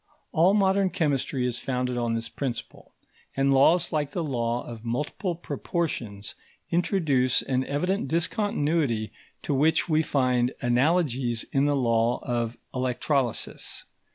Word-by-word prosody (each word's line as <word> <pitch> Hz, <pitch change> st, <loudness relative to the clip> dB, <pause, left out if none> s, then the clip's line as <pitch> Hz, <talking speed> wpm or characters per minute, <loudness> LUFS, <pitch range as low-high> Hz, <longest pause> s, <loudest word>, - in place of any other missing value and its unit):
All 180 Hz, +5 st, +4 dB
modern 195 Hz, -1 st, +3 dB
chemistry 140 Hz, -5 st, 0 dB
is 125 Hz, -1 st, -1 dB
founded 125 Hz, -1 st, -2 dB
on 120 Hz, -1 st, 0 dB
this 115 Hz, 0 st, -3 dB
principle; 130 Hz, -5 st, -6 dB, 0.5 s
and 135 Hz, 0 st, +3 dB
laws 165 Hz, +6 st, +4 dB
like 145 Hz, -2 st, -1 dB
the 175 Hz, -, -1 dB
law 120 Hz, -4 st, -1 dB
of 115 Hz, -2 st, -9 dB
multiple 150 Hz, -, -2 dB
proportions, 130 Hz, -, -4 dB, 0.4 s
introduce 155 Hz, -8 st, +2 dB
an 130 Hz, 0 st, 0 dB
evident 180 Hz, +5 st, -1 dB
discontinuity 160 Hz, -, 0 dB, 0.3 s
to 145 Hz, -, -1 dB
which 150 Hz, +6 st, +3 dB
we 155 Hz, -2 st, +3 dB
find 125 Hz, -4 st, +1 dB
analogies 125 Hz, -2 st, +1 dB
in 135 Hz, +1 st, +2 dB
the 145 Hz, 0 st, +2 dB
law 115 Hz, -2 st, +2 dB
of 120 Hz, -1 st, -2 dB, 0.2 s
electrolysis. 130 Hz, 0 st, -1 dB
135 Hz, 125 wpm, -26 LUFS, 120-160 Hz, 0.5 s, All